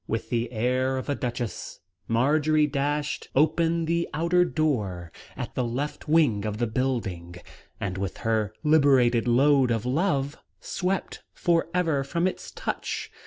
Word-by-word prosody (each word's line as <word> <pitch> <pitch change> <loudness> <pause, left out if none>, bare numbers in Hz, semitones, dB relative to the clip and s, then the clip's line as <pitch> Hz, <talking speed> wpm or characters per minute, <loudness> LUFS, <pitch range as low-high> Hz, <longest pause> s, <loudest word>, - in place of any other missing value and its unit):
With 110 0 -3
the 120 0 -1
air 130 +3 0
of 130 - -5
a - - +2
duchess, 120 -3 -4 0.3
Marjory 150 +6 +3
dashed 145 +1 -2
open 165 +3 +2
the 170 +1 0
outer 170 +3 +3
door, 105 - -1 0.3
at - - -5
the 130 - -1
left 130 +7 -4
wing 145 -11 +3
of 105 -1 -3
the 120 - +1
building, 110 -8 -2 0.4
and, 95 -1 -3
with 95 -1 -3
her 110 -2 +1
liberated 135 -6 +4
load 135 +2 +4
of 115 -1 -1
love, 140 0 0 0.2
swept 190 +1 -3
for 170 -2 +1
ever 165 -6 +1
from 170 +5 -1
its 185 - -3
touch. - - -4
135 Hz, 145 wpm, -26 LUFS, 115-155 Hz, 0.4 s, liberated